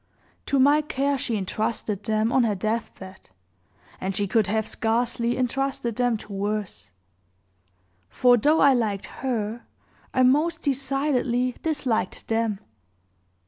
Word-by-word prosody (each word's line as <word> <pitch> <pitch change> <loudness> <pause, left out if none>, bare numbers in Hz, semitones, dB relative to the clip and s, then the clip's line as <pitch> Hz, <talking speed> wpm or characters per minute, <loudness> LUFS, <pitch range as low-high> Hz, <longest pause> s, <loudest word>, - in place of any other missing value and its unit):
To 280 - +1
my 285 +3 +5
care 280 -1 -1
she 245 -4 -2
intrusted 210 +1 -3
them 220 +1 +1
on 260 - +3
her 215 -3 +1
deathbed, 190 -2 -5 0.7
and 190 0 -3
she 205 - +1
could 215 0 +2
have 220 +2 0
scarcely 235 +1 0
intrusted 255 -2 -1
them 245 -2 +1
to 205 - -10
worse; 205 - -3 1.2
for, 245 -1 +4
though 295 +7 +3
I 280 -1 +6
liked 215 -5 -1 0.2
her, 235 -3 -3 0.4
I 255 - +2
most 305 +6 +2
decidedly 270 -3 0
disliked 260 - -2
them. 225 -3 0
235 Hz, 125 wpm, -25 LUFS, 215-270 Hz, 1.2 s, I